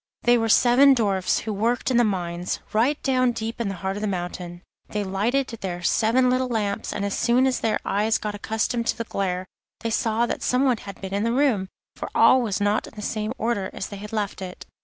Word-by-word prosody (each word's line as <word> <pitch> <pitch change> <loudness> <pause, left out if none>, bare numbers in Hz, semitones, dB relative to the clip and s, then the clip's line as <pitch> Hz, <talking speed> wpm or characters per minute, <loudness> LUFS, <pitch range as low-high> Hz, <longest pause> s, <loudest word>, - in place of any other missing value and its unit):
They 240 0 +5
were 225 -1 +1
seven 260 +5 +6
dwarfs 195 -6 +1
who 220 - -3
worked 235 +5 0
in 245 - +3
the 240 - +5
mines, 180 -4 -2
right 250 +7 +2
down 255 -2 +2
deep 230 +1 -4
in 230 - -1
the 195 - -3
heart 190 +2 -3
of - - -5
the 215 - -1
mountain. 175 -1 -5 0.3
They 210 -1 -2
lighted 220 +8 0
their 175 -2 -4
seven 235 +7 +3
little 255 +1 +1
lamps, 210 -4 -2
and 200 - -2
as 200 - -2
soon 245 +2 +3
as 260 -2 +1
their 225 - +1
eyes 215 +3 +1
got 210 -1 -4
accustomed 220 +3 -2
to - - 0
the 230 - -2
glare 185 -4 -2 0.4
they 230 - -2
saw 225 +1 +1
that - - -3
someone 250 -1 +2
had 200 -2 -10
been 190 0 -6
in 200 +1 0
the 230 - +1
room, 245 -7 +2 0.3
for - - -6
all 260 - +6
was 210 -5 -1
not 205 +1 +1
in - - -14
the 210 - -7
same 215 0 -2
order 215 -4 -1
as - - -5
they 200 - -7
had 210 +1 -8
left 210 -3 -3
it. 185 -1 -7
215 Hz, 230 wpm, -24 LUFS, 195-240 Hz, 0.4 s, seven